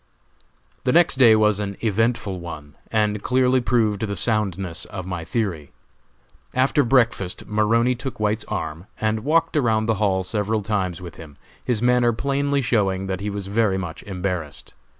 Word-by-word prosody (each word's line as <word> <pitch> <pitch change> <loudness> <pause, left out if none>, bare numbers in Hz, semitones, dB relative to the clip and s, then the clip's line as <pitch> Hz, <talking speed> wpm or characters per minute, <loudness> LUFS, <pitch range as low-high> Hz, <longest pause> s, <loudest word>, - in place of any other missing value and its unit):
The 125 - +2
next 170 -3 +4
day 120 -4 +7
was 105 -1 +3
an 100 -1 -4
eventful 115 -3 0
one, 75 -4 -8 0.2
and 105 -2 +1
clearly 130 +1 +2
proved 110 -4 +1
the 100 - -3
soundness 95 -4 -1
of 95 -3 -7
my 90 -3 -4
theory. 85 - -3 0.9
After 135 +3 +3
breakfast 115 -7 +1
Maroney 115 +4 +2
took 125 0 -6
White's 105 +1 0
arm, 80 +4 -5
and 110 0 0
walked 160 +7 +1
around 110 -6 +2
the 110 -2 0
hall 95 -2 +2
several 105 +2 -1
times 95 -5 -2
with 85 - -9
him, 75 -4 -12 0.3
his 120 -2 -1
manner 125 -1 +3
plainly 140 +3 0
showing 95 -5 +1
that 95 -1 -3
he 105 +1 -3
was 100 -1 -4
very 100 -1 +1
much 85 -4 -5
embarrassed. 90 -6 -4
105 Hz, 160 wpm, -22 LUFS, 95-120 Hz, 0.9 s, day